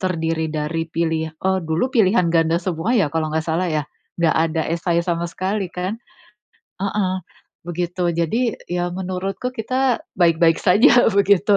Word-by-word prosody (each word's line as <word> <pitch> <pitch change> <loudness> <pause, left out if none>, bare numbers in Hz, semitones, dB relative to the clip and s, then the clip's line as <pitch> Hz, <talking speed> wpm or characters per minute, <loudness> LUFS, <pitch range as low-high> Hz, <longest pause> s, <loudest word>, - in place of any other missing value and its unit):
terdiri 165 -3 -1
dari 160 +2 -3
pilih 160 -1 -2
eee, 190 +2 0
dulu 165 +10 -1
pilihan 185 -6 +3
ganda 165 0 +3
semua 180 +6 -1
ya, 170 -10 +1
kalau 160 -1 0
enggak 160 +1 -1
salah 170 +3 0
ya. 155 -2 -1 0.3
Enggak 170 -2 +2
ada 160 0 0
essay 170 0 0
sama 170 -1 -1
sekali 190 +2 -2
kan. 185 +6 -4 0.8
Heeh, 195 -1 -1 0.5
begitu. 175 0 -1
Jadi 220 +8 0 0.2
ya 175 0 -1
menurutku 190 +5 -3
kita 255 +1 0 0.2
baik-baik 165 -2 +4
saja 225 +6 +5
begitu. 200 0 +3
175 Hz, 145 wpm, -21 LUFS, 165-195 Hz, 0.8 s, saja